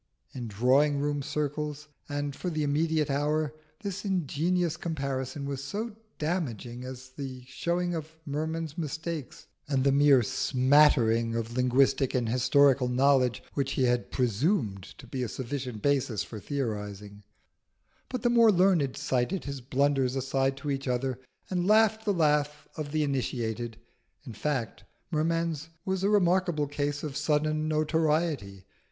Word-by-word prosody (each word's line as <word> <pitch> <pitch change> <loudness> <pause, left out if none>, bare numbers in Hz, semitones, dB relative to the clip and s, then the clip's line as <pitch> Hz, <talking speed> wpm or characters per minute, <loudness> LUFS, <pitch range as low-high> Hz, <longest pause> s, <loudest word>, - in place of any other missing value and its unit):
In 125 -2 -5
drawing 130 +7 +3
room 145 0 -1
circles, 150 +1 -3 0.2
and 145 -1 -3
for 180 - -3
the 155 -3 -1
immediate 150 0 +1
hour, 150 +2 0 0.3
this 200 -1 -4
ingenious 175 -2 0
comparison 140 -3 -3
was 140 -1 -3
as 225 +2 -2 0.3
damaging 125 - -3
as 130 0 -8
the 130 -1 -7
showing 175 +7 -1
up 160 -2 -3
of 160 +1 -23
Merman's 160 +2 -3
mistakes 160 -1 -5 0.2
and 135 -3 +1
the 140 - +4
mere 140 -2 +5
smattering 125 -3 +3
of 115 0 -3
linguistic 130 +1 +2
and 120 -2 +1
historical 130 +2 +4
knowledge 130 -1 +3
which 140 -1 -1
he 130 - +1
had 125 -1 +1
presumed 120 - 0 0.2
to - - -12
be 130 - -4
a 125 - -1
sufficient 125 -3 -5
basis 135 -7 +1
for 110 - -8
theorising; 105 -6 -4 0.9
but 255 - -4
the 240 - +4
more 230 -2 +6
learned 175 -8 +3
cited 140 +5 0
his 140 -2 -5
blunders 135 0 +1
aside 135 0 0
to 145 +1 -3
each 135 0 -3
other 125 0 -1 0.3
and 180 -1 -1
laughed 220 +1 +4
the 205 - +2
laugh 150 -4 +1
of 150 -2 -5
the 155 0 +1
initiated. 120 -5 -2 0.5
In 120 - -8
fact, 125 0 -3 0.3
Merman's 165 0 0 0.2
was 190 0 -1
a 200 - +3
remarkable 180 -6 +2
case 145 0 -2
of 150 -3 -4
sudden 155 +1 +1
notoriety. 155 - 0
145 Hz, 145 wpm, -28 LUFS, 130-155 Hz, 0.9 s, more